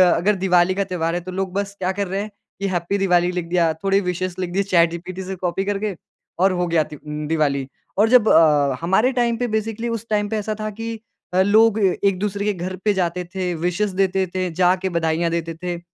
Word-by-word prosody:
अगर 205 Hz, +4 st, +2 dB
दिवाली 180 Hz, -1 st, +3 dB
का 200 Hz, -, +1 dB
त्योहार 170 Hz, -3 st, -2 dB
है, -, -, 0 dB
तो 185 Hz, +1 st, -7 dB
लोग 190 Hz, 0 st, -3 dB
बस 200 Hz, 0 st, -3 dB
क्या 185 Hz, 0 st, 0 dB
कर 200 Hz, -2 st, -1 dB
रहे 195 Hz, +2 st, -2 dB
हैं 215 Hz, -, -5 dB, 0.3 s
कि 200 Hz, -, -1 dB
हैप्पी 180 Hz, +2 st, -1 dB
दिवाली 180 Hz, -2 st, +2 dB
लिख 180 Hz, -2 st, -3 dB
दिया, 170 Hz, -2 st, +2 dB
थोड़े 195 Hz, 0 st, +3 dB
विशेज़ 180 Hz, 0 st, -3 dB
लिख 180 Hz, -1 st, -2 dB
दिए 200 Hz, +2 st, +1 dB
चैट 170 Hz, -4 st, +3 dB
जीपीटी 185 Hz, +2 st, -6 dB
से 190 Hz, +1 st, -5 dB
कॉपी 180 Hz, +1 st, -2 dB
करके 205 Hz, -1 st, -2 dB, 0.4 s
और 190 Hz, +1 st, +4 dB
हो 180 Hz, -1 st, 0 dB
गया 165 Hz, -2 st, +2 dB
त्य 150 Hz, -, -10 dB
उम, 150 Hz, +1 st, -6 dB
दिवाली 145 Hz, -4 st, 0 dB, 0.3 s
और 220 Hz, +2 st, +4 dB
जब 240 Hz, -3 st, +5 dB
अ, 145 Hz, -4 st, +4 dB
हमारे 205 Hz, +9 st, +2 dB
टाइम 235 Hz, -2 st, +1 dB
पे 245 Hz, 0 st, -1 dB
बेसिकली 225 Hz, +1 st, -2 dB
उस 230 Hz, -1 st, -4 dB
टाइम 205 Hz, -1 st, 0 dB
पे 220 Hz, -, -1 dB
ऐसा 215 Hz, +1 st, -2 dB
था 215 Hz, 0 st, -2 dB
कि 225 Hz, +1 st, -6 dB, 0.3 s
अ, 185 Hz, -, +4 dB
लोग 220 Hz, +2 st, +4 dB
एक-दूसरे 200 Hz, +1 st, 0 dB
के 210 Hz, -, +1 dB
घर 185 Hz, 0 st, -5 dB
पे 210 Hz, -, +4 dB
जाते 180 Hz, -1 st, -1 dB
थे, 180 Hz, -2 st, -1 dB
विशेज़ 180 Hz, +4 st, -1 dB
देते 190 Hz, 0 st, +1 dB
थे, 185 Hz, -1 st, 0 dB
जाके 185 Hz, +2 st, +2 dB
बधाइयाँ 165 Hz, +1 st, +1 dB
देते 165 Hz, 0 st, -2 dB
थे 175 Hz, -1 st, -3 dB
185 Hz, 225 wpm, -21 LUFS, 175-205 Hz, 0.4 s, जब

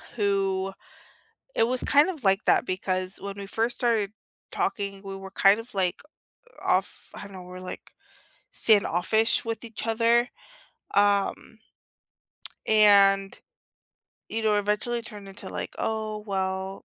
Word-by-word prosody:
Who 195 Hz, -3 st, 0 dB, 0.8 s
it -, -, +3 dB
was 250 Hz, +1 st, +1 dB
kind 290 Hz, +4 st, +4 dB
of 320 Hz, -10 st, -6 dB
like 195 Hz, +2 st, +3 dB
that -, -, +4 dB
because 185 Hz, 0 st, -2 dB
when 200 Hz, 0 st, -6 dB
we 200 Hz, 0 st, -7 dB
first 225 Hz, +4 st, -1 dB
started 225 Hz, -5 st, +1 dB, 0.4 s
talking, 195 Hz, 0 st, -2 dB
we 195 Hz, 0 st, -6 dB
were 195 Hz, 0 st, -9 dB
kind 195 Hz, +3 st, +4 dB
of, 230 Hz, 0 st, -11 dB
like, 185 Hz, -2 st, 0 dB, 0.6 s
off -, -, 0 dB
I -, -, -8 dB
don't 200 Hz, -1 st, -11 dB
know, 185 Hz, -, -8 dB
were, 180 Hz, 0 st, -10 dB
like, 185 Hz, -, -9 dB, 0.6 s
standoffish 215 Hz, +1 st, +3 dB
with 230 Hz, +1 st, -4 dB
each 230 Hz, -1 st, -7 dB
other, 230 Hz, +2 st, +3 dB, 0.7 s
um 205 Hz, +2 st, +1 dB, 1.1 s
and, 200 Hz, -2 st, +5 dB, 0.9 s
you 225 Hz, -, -3 dB
know, 215 Hz, -1 st, +3 dB
eventually 210 Hz, +4 st, 0 dB
turned 210 Hz, -3 st, -9 dB
into, 195 Hz, -, -8 dB
like, -, -, -5 dB
"Oh, 215 Hz, -1 st, -2 dB
well" 190 Hz, -1 st, -3 dB
200 Hz, 135 wpm, -26 LUFS, 195-225 Hz, 1.1 s, and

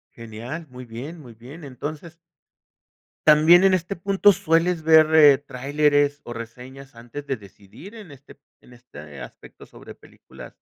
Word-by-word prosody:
Genial. 115 Hz, +8 st, -9 dB
Muy 125 Hz, 0 st, -11 dB
bien, 135 Hz, +9 st, -9 dB
muy 120 Hz, -4 st, -14 dB
bien, 135 Hz, +8 st, -13 dB
entonces 150 Hz, +5 st, -9 dB, 1.1 s
también 160 Hz, +4 st, +6 dB
en 190 Hz, -1 st, +4 dB
este 185 Hz, +2 st, -2 dB
punto, 195 Hz, +3 st, +2 dB
¿sueles 165 Hz, -1 st, 0 dB
ver 155 Hz, -3 st, +5 dB
tráileres 145 Hz, +2 st, 0 dB
o 120 Hz, -, -8 dB
reseñas 125 Hz, +3 st, -11 dB
antes 120 Hz, +5 st, -11 dB
de 135 Hz, -, -2 dB
decidir 100 Hz, -, -16 dB
en 205 Hz, -9 st, -13 dB
este 140 Hz, 0 st, -17 dB, 0.2 s
en 125 Hz, -, -19 dB
este 75 Hz, -, -14 dB
aspecto -, -, -14 dB
sobre -, -, -14 dB
películas -, -, -16 dB
145 Hz, 140 wpm, -22 LUFS, 125-165 Hz, 1.1 s, también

